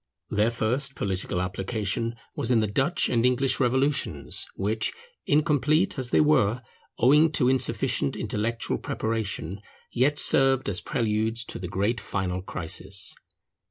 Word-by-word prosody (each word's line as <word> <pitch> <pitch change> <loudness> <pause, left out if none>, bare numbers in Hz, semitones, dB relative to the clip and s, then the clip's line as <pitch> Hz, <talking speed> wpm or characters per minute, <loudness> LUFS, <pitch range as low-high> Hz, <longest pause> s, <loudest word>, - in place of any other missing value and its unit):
Their 105 +2 +2
first 125 +4 -2
political 95 -2 -2
application 100 +4 -2 0.2
was - - -2
in 120 -3 +4
the 110 - +2
Dutch 135 - +1
and 115 -2 +1
English 125 +1 +1
revolutions, 135 +3 0
which, 110 +3 0 0.3
incomplete 155 +4 +2
as 125 -2 -2
they - - +4
were, 125 -6 +2 0.3
owing 150 +6 +5
to 125 - +2
insufficient 130 +1 +1
intellectual 115 +2 -2
preparation, 105 -4 -3 0.3
yet 135 +4 +2
served 135 -2 +4
as 100 0 0
preludes 115 -2 0
to - - -8
the 90 - -5
great 100 +6 -1
final 95 -2 -3
crisis. 90 -3 -1
115 Hz, 130 wpm, -26 LUFS, 105-135 Hz, 0.3 s, owing